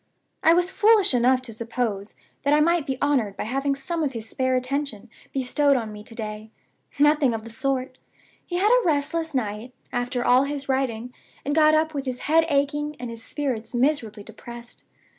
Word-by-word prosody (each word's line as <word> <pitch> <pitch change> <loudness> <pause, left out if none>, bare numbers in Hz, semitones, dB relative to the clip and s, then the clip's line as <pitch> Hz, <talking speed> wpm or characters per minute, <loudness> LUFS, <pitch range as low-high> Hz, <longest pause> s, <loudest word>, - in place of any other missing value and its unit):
I 325 - +6
was 355 +1 +2
foolish 420 -4 +4
enough 255 +1 +3
to 235 -3 -6
suppose 225 -3 -3 0.3
that 285 +1 +3
I - - +4
might 335 0 +2
be 265 -1 -2
honored 250 -9 +1
by - - -2
having 275 +5 -1
some 325 +5 -3
of 285 -3 -1
his 225 -2 -6
spare 260 +2 0
attention 255 -4 -3 0.2
bestowed 275 +1 +2
on 225 -3 -4
me 210 0 -9
to 225 - -12
day. 215 -1 -6 0.5
Nothing 295 -4 +4
of 220 - -5
the 230 - -9
sort! 260 +1 -2 0.4
He 350 - -6
had 410 +4 +3
a - - +5
restless 320 0 0
night, 225 0 -3 0.2
after 245 0 -1
all 255 +2 +5
his 280 -1 -4
writing, 250 -3 -1 0.3
and 290 - 0
got 310 0 +5
up 315 0 +1
with 280 -2 -3
his 255 -1 -4
head 325 +2 +3
aching, 295 +1 0
and 245 -1 -5
his 230 -1 -9
spirits 255 -4 -3
miserably 240 -6 0
depressed. 240 +2 -11
265 Hz, 190 wpm, -24 LUFS, 235-295 Hz, 0.5 s, I